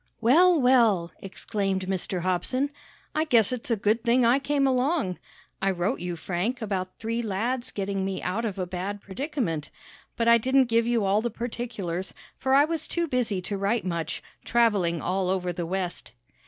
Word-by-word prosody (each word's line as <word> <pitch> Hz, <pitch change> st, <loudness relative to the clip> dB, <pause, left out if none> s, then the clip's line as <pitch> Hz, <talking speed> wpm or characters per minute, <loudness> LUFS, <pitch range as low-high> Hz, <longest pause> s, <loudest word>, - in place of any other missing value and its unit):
"Well, 335 Hz, +8 st, +5 dB
well!" 230 Hz, -9 st, +4 dB
exclaimed 195 Hz, -1 st, -2 dB
Mr. 185 Hz, -1 st, -2 dB
Hobson. 220 Hz, +11 st, 0 dB, 0.4 s
"I 310 Hz, +1 st, +1 dB
guess 235 Hz, -9 st, +4 dB
it's 250 Hz, -1 st, -4 dB
a 230 Hz, -, +3 dB
good 215 Hz, +2 st, +1 dB
thing 240 Hz, +1 st, +3 dB
I 245 Hz, +4 st, +4 dB
came 280 Hz, 0 st, +1 dB
along. 260 Hz, -, +1 dB, 0.4 s
I 195 Hz, -, +2 dB
wrote 190 Hz, +6 st, -1 dB
you, 175 Hz, -1 st, -3 dB
Frank, 180 Hz, +9 st, -2 dB
about 190 Hz, -4 st, -3 dB
three 230 Hz, +1 st, -2 dB
lads 235 Hz, +4 st, -2 dB
getting 195 Hz, -1 st, -2 dB
me 190 Hz, 0 st, -2 dB
out 205 Hz, +6 st, -2 dB
of 210 Hz, -4 st, -3 dB
a 185 Hz, -, -1 dB
bad 185 Hz, +3 st, -4 dB
predicament, 200 Hz, -, -3 dB, 0.5 s
but 230 Hz, -, +1 dB
I 235 Hz, 0 st, +7 dB
didn't 260 Hz, +1 st, +3 dB
give 230 Hz, 0 st, +3 dB
you 235 Hz, -4 st, +2 dB
all 200 Hz, +2 st, +3 dB
the 240 Hz, -, -1 dB
particulars, 215 Hz, -6 st, -4 dB, 0.2 s
for 265 Hz, 0 st, +2 dB
I 285 Hz, +1 st, +6 dB
was 325 Hz, 0 st, -3 dB
too 340 Hz, -1 st, -1 dB
busy 230 Hz, -, -1 dB
to 200 Hz, +1 st, -3 dB
write 205 Hz, +3 st, 0 dB
much, 170 Hz, -3 st, -3 dB, 0.2 s
traveling 205 Hz, -8 st, +2 dB
all 185 Hz, +1 st, 0 dB
over 180 Hz, -1 st, -1 dB
the 175 Hz, -1 st, -4 dB
West." 180 Hz, -, -4 dB
215 Hz, 180 wpm, -26 LUFS, 185-250 Hz, 0.5 s, I